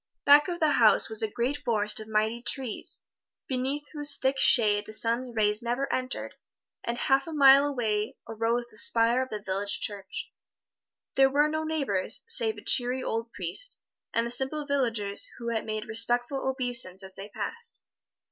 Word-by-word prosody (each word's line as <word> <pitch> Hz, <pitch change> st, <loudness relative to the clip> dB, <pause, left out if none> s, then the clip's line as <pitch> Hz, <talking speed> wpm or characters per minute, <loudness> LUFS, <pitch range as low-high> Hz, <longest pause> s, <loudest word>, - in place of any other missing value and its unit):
Back 290 Hz, +1 st, +7 dB
of 345 Hz, -1 st, -4 dB
the 310 Hz, -3 st, +3 dB
house 225 Hz, -3 st, +4 dB
was 220 Hz, -, +2 dB
a 220 Hz, -, 0 dB
great 245 Hz, +6 st, -1 dB
forest 210 Hz, -5 st, 0 dB
of 215 Hz, -, -8 dB
mighty 220 Hz, +2 st, 0 dB
trees, 250 Hz, -3 st, -2 dB, 0.5 s
beneath 265 Hz, +3 st, -2 dB
whose 290 Hz, -1 st, +2 dB
thick 265 Hz, +1 st, 0 dB
shade 210 Hz, -3 st, +3 dB
the 215 Hz, -, -9 dB
sun's 235 Hz, +3 st, -2 dB
rays 210 Hz, -1 st, +2 dB
never 245 Hz, +4 st, -1 dB
entered, 255 Hz, +1 st, -3 dB, 0.5 s
and 235 Hz, 0 st, -3 dB
a -, -, -5 dB
half 270 Hz, +2 st, +2 dB
mile 280 Hz, -2 st, +6 dB
away 220 Hz, -6 st, -1 dB
arose 230 Hz, +2 st, -1 dB
the 215 Hz, -, -16 dB
spire 235 Hz, +2 st, +3 dB
of 260 Hz, -, -4 dB
the 215 Hz, -, -4 dB
village 200 Hz, +1 st, -2 dB
church. 200 Hz, -2 st, -5 dB, 0.8 s
There 270 Hz, 0 st, +5 dB
were 290 Hz, +2 st, +3 dB
no 315 Hz, +1 st, -2 dB
neighbors, 280 Hz, -12 st, -1 dB
save 460 Hz, -1 st, +1 dB
a -, -, -11 dB
cheery 250 Hz, +1 st, +1 dB
old 230 Hz, +1 st, -3 dB
priest, -, -, -5 dB, 0.3 s
and 230 Hz, -, 0 dB
the 235 Hz, -, -4 dB
simple 270 Hz, +4 st, -3 dB
villagers 230 Hz, -8 st, +1 dB
who 235 Hz, 0 st, -3 dB
made 215 Hz, -1 st, -4 dB
respectful 240 Hz, +4 st, 0 dB
obeisance 245 Hz, -8 st, 0 dB
as 190 Hz, 0 st, -9 dB
they 195 Hz, +2 st, -9 dB
passed. 465 Hz, -, -5 dB
240 Hz, 170 wpm, -27 LUFS, 215-275 Hz, 0.8 s, Back